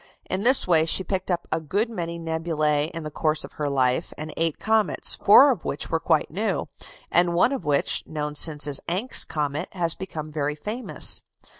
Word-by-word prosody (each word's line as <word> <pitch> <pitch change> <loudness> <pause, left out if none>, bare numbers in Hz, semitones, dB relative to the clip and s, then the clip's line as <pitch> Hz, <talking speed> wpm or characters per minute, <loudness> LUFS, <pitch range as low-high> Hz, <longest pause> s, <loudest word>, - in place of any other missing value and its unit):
In 185 +1 -2
this 250 +4 +3
way 160 -2 +3
she 190 - +4
picked 190 -1 -3
up 175 -1 -2
a 160 - 0
good 200 +9 -1
many 170 -7 -5
nebulæ 160 -2 -1
in 165 -1 -7
the 155 - -6
course 155 0 -1
of - - -10
her 150 -1 -3
life, 130 -2 0
and 155 +1 -6
eight 165 -2 -1
comets, 220 -1 +1
four - - +6
of - - -4
which - - -4
were - - +1
quite - - 0
new, - - -2 0.4
and 175 0 +2
one 185 +9 +3
of 265 -11 -4
which, 145 -1 +2
known 150 -1 -4
since 150 -1 +1
as 145 -2 0
Encke's 195 +9 +1
comet, 150 +2 -3
has 170 -4 +2
become 155 -5 -7
very 150 -1 -2
famous. 215 +10 +1
160 Hz, 195 wpm, -24 LUFS, 150-185 Hz, 0.4 s, four